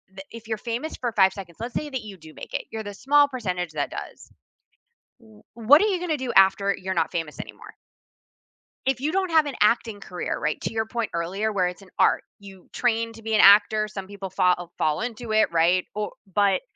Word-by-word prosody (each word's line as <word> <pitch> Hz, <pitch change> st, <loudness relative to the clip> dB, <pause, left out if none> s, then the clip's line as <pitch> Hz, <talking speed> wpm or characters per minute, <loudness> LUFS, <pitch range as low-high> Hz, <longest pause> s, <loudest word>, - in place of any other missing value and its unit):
tha 195 Hz, -, -8 dB
if 230 Hz, -1 st, -11 dB
you're 220 Hz, -1 st, -2 dB
famous 240 Hz, +8 st, -4 dB
for 240 Hz, -2 st, -1 dB
5 190 Hz, -3 st, +4 dB
seconds, 180 Hz, -5 st, -10 dB
let's 235 Hz, +1 st, -5 dB
say 300 Hz, -, -2 dB
that 260 Hz, -3 st, -4 dB
you 205 Hz, -3 st, -10 dB
do 160 Hz, -2 st, -14 dB
make -, -, -10 dB
it. -, -, -3 dB
You're 220 Hz, -1 st, -5 dB
the 205 Hz, -1 st, -7 dB
small 285 Hz, +6 st, +4 dB
percentage 185 Hz, -, -4 dB
that 145 Hz, -2 st, -2 dB
does. -, -, -9 dB, 0.9 s
W 220 Hz, -2 st, -19 dB
what 235 Hz, +6 st, +6 dB
are 420 Hz, -, +3 dB
you 380 Hz, -4 st, 0 dB
gonna 320 Hz, -5 st, -1 dB
do 255 Hz, -2 st, -3 dB
after 195 Hz, +1 st, +4 dB
you're 190 Hz, 0 st, -4 dB
not -, -, -7 dB
famous 165 Hz, -3 st, -4 dB
anymore? -, -, -10 dB, 1.1 s
If 265 Hz, -1 st, +1 dB
you 300 Hz, +4 st, -2 dB
don't 375 Hz, -2 st, 0 dB
have 315 Hz, -2 st, +5 dB
an 285 Hz, -, -5 dB
acting 215 Hz, -1 st, +2 dB
career, 180 Hz, -3 st, -4 dB
right, 150 Hz, -, -2 dB
to -, -, -4 dB
your 220 Hz, 0 st, -1 dB
point 230 Hz, 0 st, -3 dB
earlier 190 Hz, +6 st, -2 dB
where 185 Hz, -3 st, +1 dB
it's 180 Hz, +2 st, -7 dB
an 195 Hz, -, -16 dB
art, -, -, +3 dB, 0.2 s
you 195 Hz, -2 st, -14 dB
train 230 Hz, -1 st, 0 dB
to 225 Hz, -, -13 dB
be 225 Hz, 0 st, -3 dB
an 215 Hz, -, +3 dB
actor, 215 Hz, +1 st, +6 dB
some 195 Hz, -3 st, -7 dB
people 200 Hz, -1 st, -7 dB
fa 180 Hz, -1 st, +3 dB, 0.2 s
fall 150 Hz, -1 st, 0 dB
into 235 Hz, -1 st, -5 dB
it, 215 Hz, -4 st, +3 dB
right? 170 Hz, +2 st, +3 dB
O 210 Hz, 0 st, -3 dB, 0.2 s
but 200 Hz, 0 st, +3 dB
215 Hz, 220 wpm, -24 LUFS, 190-240 Hz, 1.1 s, what